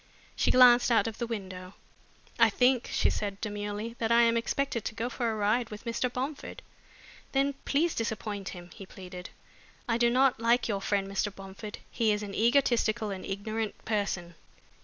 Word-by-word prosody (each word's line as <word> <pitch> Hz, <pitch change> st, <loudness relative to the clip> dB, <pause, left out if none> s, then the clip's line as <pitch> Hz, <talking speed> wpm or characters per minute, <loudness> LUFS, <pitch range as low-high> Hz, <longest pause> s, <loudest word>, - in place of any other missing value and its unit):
She -, -, +1 dB
glanced 250 Hz, -1 st, +7 dB
out 235 Hz, -, +4 dB
of 225 Hz, -1 st, -5 dB
the 235 Hz, -, -2 dB
window. 185 Hz, -4 st, -6 dB, 0.6 s
"I 230 Hz, -1 st, +7 dB
think," 250 Hz, +3 st, +2 dB
she -, -, +2 dB
said 200 Hz, -1 st, -3 dB
demurely, 210 Hz, +1 st, -4 dB
"that 225 Hz, 0 st, 0 dB
I 235 Hz, 0 st, +6 dB
am 230 Hz, 0 st, +3 dB
expected 235 Hz, 0 st, -1 dB
to 215 Hz, -, -4 dB
go 230 Hz, +2 st, -2 dB
for 235 Hz, -1 st, -1 dB
a 220 Hz, -, -2 dB
ride 215 Hz, +3 st, +1 dB
with 210 Hz, +3 st, -9 dB
Mr. 235 Hz, +2 st, -1 dB
Bomford." 270 Hz, +4 st, -5 dB, 0.7 s
"Then 275 Hz, +1 st, +2 dB
please 320 Hz, +4 st, +1 dB
disappoint 215 Hz, -3 st, -3 dB
him," 175 Hz, -1 st, -10 dB
he 195 Hz, -, -11 dB
pleaded. 180 Hz, -2 st, -9 dB, 0.6 s
"I 230 Hz, -1 st, +1 dB
do 235 Hz, 0 st, +4 dB
not 255 Hz, 0 st, +3 dB
like 235 Hz, +2 st, +2 dB
your 200 Hz, -3 st, -2 dB
friend 195 Hz, 0 st, 0 dB
Mr. 195 Hz, +1 st, -1 dB
Bomford. 195 Hz, +2 st, -8 dB
He 225 Hz, -2 st, +2 dB
is 210 Hz, 0 st, -1 dB
an 200 Hz, -1 st, -6 dB
egotistical 235 Hz, -2 st, +2 dB
and 190 Hz, -1 st, -6 dB
ignorant 215 Hz, +2 st, -4 dB
person. 200 Hz, -5 st, -2 dB
225 Hz, 180 wpm, -29 LUFS, 200-240 Hz, 0.7 s, glanced